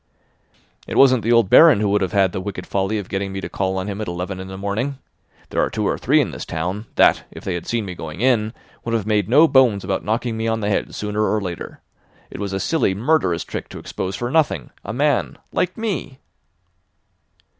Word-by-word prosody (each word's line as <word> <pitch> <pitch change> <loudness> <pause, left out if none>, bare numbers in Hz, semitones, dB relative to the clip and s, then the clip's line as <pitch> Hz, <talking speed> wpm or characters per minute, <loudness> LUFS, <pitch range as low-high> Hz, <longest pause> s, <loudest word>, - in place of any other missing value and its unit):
"It - - -3
wasn't 130 -3 +6
the 115 - 0
old 115 -3 +5
Baron 160 - +7
who 105 - +1
would 105 +1 +2
have 95 - -1
had 95 -2 +3
the 95 - -4
wicked 95 -2 -6
folly 100 +2 -1
of 100 -3 -5
getting 95 0 -3
me 95 - -4
to 85 - -5
call 95 +1 -1
on 95 - -2
him 105 +1 -4
at 110 - -4
eleven 90 +2 -4
in 95 - -7
the 95 0 -8
morning. 110 +8 -2 0.5
There - - +1
are - - 0
two - - -1
or - - +1
three - - +2
in - - 0
this - - -6
town 90 +7 -4
that, - - +4
if - - -11
they 95 - -2
had 85 - -5
seen 115 -3 -1
me 90 - -5
going 80 -1 -8
in, 115 -3 +2 0.3
would 115 0 -1
have 110 -4 -1
made 105 -3 +1
no 150 +7 +6
bones 125 -9 +4
about 95 0 -2
knocking 115 +2 -1
me 110 0 -2
on 115 0 0
the 100 - -1
head 105 - -1
sooner 105 0 -2
or 110 - +1
later. 90 -4 -6 0.5
It - - -8
was 100 -1 -3
a 95 - -2
silly, 125 -7 +1
murderous 105 - +1
trick - - -6
to - - -9
expose 95 +1 -4
for 120 +3 -3
nothing 145 - +1
a 100 - -5
man—like 145 +7 -1
me." 195 - -3
105 Hz, 230 wpm, -21 LUFS, 95-120 Hz, 0.5 s, Baron